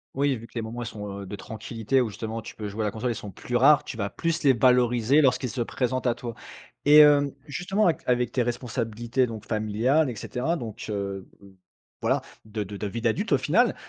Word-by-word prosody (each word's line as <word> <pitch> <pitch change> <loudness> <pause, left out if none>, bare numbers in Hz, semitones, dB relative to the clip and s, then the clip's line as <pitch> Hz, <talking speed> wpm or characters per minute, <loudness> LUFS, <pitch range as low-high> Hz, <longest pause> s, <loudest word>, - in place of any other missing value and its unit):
Oui, 140 0 +2
vu 115 - -9
que - - -18
les 115 - -1
moments, 115 +2 -6
ils - - -6
sont, 105 -2 -6
heu, - - -7
de 100 - -6
tranquillité 115 +4 -2
où, 120 - -1
justement, 110 +2 -5
tu - - -9
peux 105 - -4
jouer 105 +2 -4
à - - +1
la 105 - 0
console, 120 +4 -2
ils - - -3
sont 105 -1 -7
plus 125 - -6
rares. 140 +4 +6
Tu - - -6
vas 100 -3 -2
plus 165 0 -2
les 140 - +6
valoriser 125 +2 +4
lorsqu'ils 130 -2 +2
se 125 - -3
présentent 130 +2 -1
à 120 -2 +2
toi. 120 -1 -6 0.5
Et 150 +1 +7
hem, 145 -2 +7 0.2
justement 195 +8 0
avec 165 - +2
avec 125 -1 +1
tes 130 - +1
responsabilités 120 0 -1
donc 110 -3 -7
familiales, 115 +7 +1
et 120 - -5
cetera, 135 +11 -2
donc, 115 -6 -7
heu 100 -2 -4
v 100 - -15 0.5
voilà - - +1 0.2
de 110 0 -4
de 100 +1 -8
de 105 - -3
vie 115 +4 -4
d'adulte 115 -2 0
au - - +6
final, - - +2
120 Hz, 235 wpm, -26 LUFS, 110-130 Hz, 0.5 s, Et